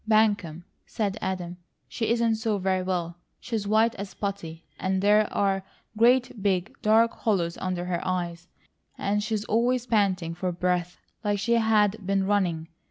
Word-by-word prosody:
"Buncombe!" 205 -7 +2 0.2
said 205 -3 -2
Adam. 180 -2 -3 0.3
"She 220 - -2
isn't 230 -1 +2
so 220 -2 0
very 190 -1 0
well. 175 -2 -2 0.2
She's 220 -4 -3
white 220 +2 +3
as 200 0 -7
putty, 170 -5 -5
and 190 0 0
there 210 +2 +3
are 195 -1 +1 0.3
great 240 0 +3
big, 190 -1 0
dark 225 +2 +4
hollows 175 -6 0
under 185 -1 -2
her 175 -1 -2
eyes, 175 -1 -3 0.5
and 205 +1 0
she's 215 0 -2
always 240 +2 +1
panting 195 -7 +1
for 180 +2 -2
breath 180 0 -1 0.3
like 205 -1 +1
she 235 +4 0
had 220 -2 +2
been 195 0 +1
running. 180 -5 0
200 Hz, 155 wpm, -26 LUFS, 180-220 Hz, 0.5 s, dark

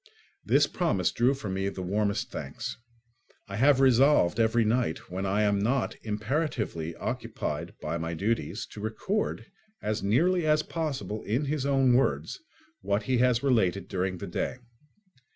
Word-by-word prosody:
This - - +4
promise 130 - 0
drew 125 +4 +2
from 110 -8 -5
me 95 +1 -1
the 95 -1 -6
warmest 100 +2 -1
thanks. - - -5 0.7
I 100 0 -5
have 135 +3 +5
resolved 130 -6 +4
every 115 0 +3
night, 110 -8 -1
when 95 +2 -2
I 100 +2 +2
am 100 -1 +2
not 125 +6 0
imperatively 110 - -2
occupied - - -4
by 85 +2 -3
my 80 +1 -3
duties, 100 +1 -1
to 105 - -8
record, 110 - -2 0.3
as 110 +1 -2
nearly 170 - +2
as 150 0 +3
possible 135 - -3
in 120 +8 0
his 140 -1 -1
own 135 -2 +4
words, 80 - +1 0.4
what 100 +2 0
he 125 +3 +1
has 125 0 +3
related 100 -8 +2
during 95 0 -2
the - - -6
day. - - -2
110 Hz, 150 wpm, -28 LUFS, 95-135 Hz, 0.7 s, have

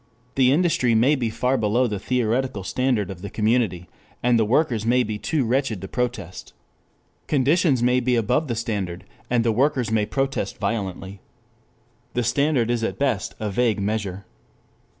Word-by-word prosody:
The 130 0 +4
industry 145 -7 +2
may 125 +7 +4
be 125 -6 0
far 125 +4 0
below 110 +4 +2
the 105 -4 -2
theoretical 125 -1 -1
standard 120 -1 0
of 90 -2 -9
the 100 - -6
community, 105 -5 0 0.4
and 120 -1 +3
the 110 - +3
workers 120 -1 +1
may 125 +2 +3
be 105 -2 -4
too 140 +4 0
wretched 125 -3 0
to 95 - -7
protest. 115 -7 -4 0.7
Conditions 145 -1 +2
may 125 +1 +3
be 125 0 +1
above 120 +7 +1
the 120 - -2
standard, 100 -6 -3 0.3
and 120 -1 +2
the 115 - +3
workers 125 -1 +1
may 105 -2 +1
protest 135 0 -2
violently. 95 -3 -4 0.9
The 125 - +1
standard 125 0 +1
is 120 -1 -1
at - - -2
best 130 -9 -1
a 105 -2 -3
vague 115 0 +1
measure. 100 -2 -3
115 Hz, 165 wpm, -23 LUFS, 105-130 Hz, 0.9 s, The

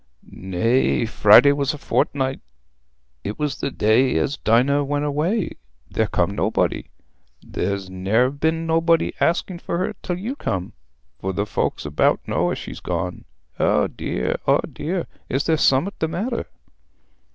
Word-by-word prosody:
"Nay; 115 +7 +1
Friday 110 +5 +6
was 140 0 0
a - - -9
fortnight—it 65 - -4
was 145 -3 -2
the - - -1
day 115 -1 +2
as 80 - 0
Dinah 135 +6 +2
went 145 +1 -1
away—there 145 - -2
come - - 0
nobody. - - 0 0.6
There's 100 -1 -3
ne'er 100 +7 +1
been 160 +3 -1
nobody 165 0 +2
asking 175 +1 0
for 170 - -3
her 185 - -1
till 180 -1 -3
you 225 +9 -4
come, 95 - -3 0.5
for 95 0 -3
the 100 +3 -1
folks 105 - -2
about 75 0 +1
know - - +1
as - - -2
she's - - -8
gone. - - -4 0.3
Eh - - +3
dear, 60 - -2
eh - - +5 0.2
dear, 175 +2 -3 0.2
is 135 +2 0
there 160 - +2
summat 150 +6 +2
the 160 - +1
matter?" 230 +9 -3
135 Hz, 140 wpm, -22 LUFS, -, 0.6 s, Friday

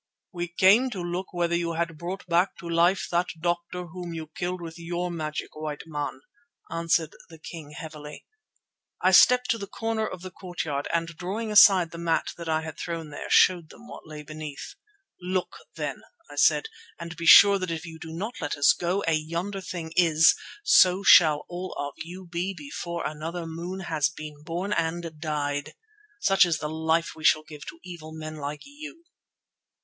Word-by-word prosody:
"We 175 -1 -3
came 195 +9 +4
to 210 -6 -6
look 175 +2 -4
whether 175 -1 -1
you 170 -1 -1
had 165 0 -2
brought 180 +3 -5
back 175 +1 +1
to 170 - -9
life 170 +3 +2
that 175 +1 +1
doctor 175 +1 -2
whom 175 0 -7
you 160 -1 -7
killed 180 +1 -3
with 165 0 -8
your 175 +1 -3
magic, 155 -2 -5
white 155 -1 -5
man," 145 -4 -4 0.5
answered 165 -1 0
the 165 - -12
king 155 -2 -10
heavily. 150 -2 -9 0.7
I - - +3
stepped 250 0 +6
to 230 - -1
the 200 - -6
corner 225 +1 -2
of 185 -3 -8
the 185 - -7
court 175 -1 -6
yard 145 -2 -2
and, 165 0 0
drawing 190 +7 -4
aside 190 -5 +7
a 170 - -7
mat 170 -1 0
that 170 -1 -7
I 160 0 +1
had 160 -1 -8
thrown 165 -3 -5
there, 145 - -7
showed 175 -4 +4
them 240 - -15
what - - -10
lay 150 -1 -8
beneath. 155 -1 -8 0.5
"Look 185 0 -2 0.2
then," - - -4 0.3
I - - -10
said, - - +4 0.3
"and 170 0 -7
be 170 +1 -4
sure 200 +3 +9
that 185 -1 -3
if 165 0 -4
you 160 -1 -10
do 160 0 -8
not 205 +9 -5
let 145 - -3
us 140 - +6
go, 180 +3 -1
as 165 -4 +1
yonder 170 +6 -4
thing 165 -3 -6
is, 165 -2 +5 0.3
so 185 - +5
shall 160 -6 +7
all 180 +1 -6
of 145 0 -4
you 180 +3 -8
be 175 +3 -3
before 170 +3 -5
another 165 +3 -4
moon 170 +4 -6
has 155 -4 0
been 155 -2 -10
born 175 +6 -3
and 165 -2 -2
died. 145 -2 -2 0.5
Such 195 - +5
is 165 -2 0
the 150 - -4
life 160 +1 0
we 160 - -12
shall 155 0 +4
give 150 -1 -11
to - - -8
evil 170 -3 -9
men 155 0 -7
like 145 0 -5
you." 300 +4 -11
170 Hz, 190 wpm, -26 LUFS, 155-180 Hz, 0.7 s, sure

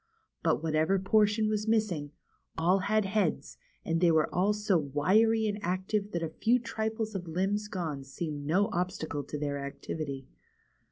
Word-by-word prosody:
But, - - +1
whatever 160 +4 +2
portion 210 +2 +3
was 215 0 -1
missing, 210 -10 +1 0.5
all 175 +4 +3
had 210 +2 +1
heads, 195 -4 -1 0.3
and 165 +1 0
they 175 - +5
were 160 -2 +2
all 190 +4 +3
so 210 -1 +1
wiry 200 +11 +3
and 205 -1 -1
active 195 +2 -1
that 170 -1 -1
a 165 - -2
few 235 +2 +4
trifles 220 -2 -3
of 180 -3 -5
limbs 195 +5 -1
gone 160 -9 -4
seemed 145 +1 -5
no 200 +7 +2
obstacle 175 -5 -2
to 145 +2 -6
their 145 -1 -2
activity. 140 -1 -5
185 Hz, 160 wpm, -30 LUFS, 155-210 Hz, 0.5 s, they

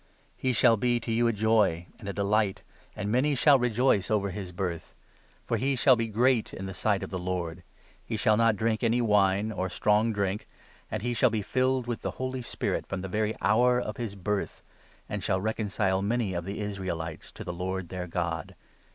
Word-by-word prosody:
He 130 - 0
shall 115 -1 +4
be 120 +2 +1
to 115 - -5
you 120 +1 +3
a - - +3
joy 105 -6 +2
and 110 - -11
a - - 0
14 - - -11
delight; 100 0 +1 0.3
and 100 +2 -3
many 140 +5 +2
shall 140 +1 +5
rejoice 120 -4 +2
over 100 -3 +1
his 95 -1 -6
birth. 90 -2 -4 0.5
For - - 0
he 135 +2 +1
shall 130 +1 +5
15 115 -2 0
be - - -10
great 120 +1 +2
in 95 - -6
the 95 - -5
sight 100 +1 0
of - - -6
the 95 - -3
Lord; 90 -2 -3 0.4
he - - -3
shall 110 - +3
not 115 0 +3
drink 110 +1 0
any 120 0 +2
wine 105 -2 +3
or 95 -2 -2
strong 105 +4 +2
drink, 100 -1 -2 0.4
and - - -4
he 120 0 0
shall 125 +2 +4
be 110 -2 -2
filled 130 +2 +1
with 120 -1 -3
the - - -2
Holy 130 0 -3
Spirit 120 - -2
from 95 -1 -4
the 95 - -4
very 105 +2 0
hour 125 +3 +4
of 105 -4 -4
his 115 -4 -4
birth, 100 +1 -3 0.4
and - - -4
shall 95 - +1
reconcile 100 -2 0
many 105 -1 0
of 85 -1 -3
the 100 - -4
16 105 -1 -3
Israelites 85 -5 -5
to - - -8
the - - -5
Lord 90 0 -3
their 90 -1 -5
God. 85 -1 -3
105 Hz, 215 wpm, -28 LUFS, 95-120 Hz, 0.5 s, shall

